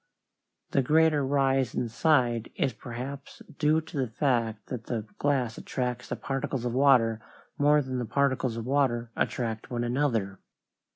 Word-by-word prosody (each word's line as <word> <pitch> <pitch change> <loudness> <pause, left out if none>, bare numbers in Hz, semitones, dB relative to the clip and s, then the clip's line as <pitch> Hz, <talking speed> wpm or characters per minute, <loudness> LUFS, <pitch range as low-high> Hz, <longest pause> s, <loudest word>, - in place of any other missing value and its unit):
The 135 - +3
greater 155 +2 +3
rise 135 -2 +1
inside 120 -1 +1
is 135 -3 0
perhaps 130 +4 -8 0.2
due 155 +1 +3
to 160 0 -9
the 130 - +1
fact 115 -3 0
that 120 -3 -5
the 115 -4 -3
glass 130 -6 0
attracts 125 -2 -3
the - - -2
particles 135 -2 -3
of 120 - -1
water 125 -5 +4 0.4
more 145 +1 +4
than 130 -1 -3
the 120 - -2
particles 130 -2 0
of 115 - -4
water 125 -4 +1
attract 115 -3 -2
one 120 -1 -2
another. 120 -6 0
130 Hz, 150 wpm, -28 LUFS, 115-140 Hz, 0.4 s, water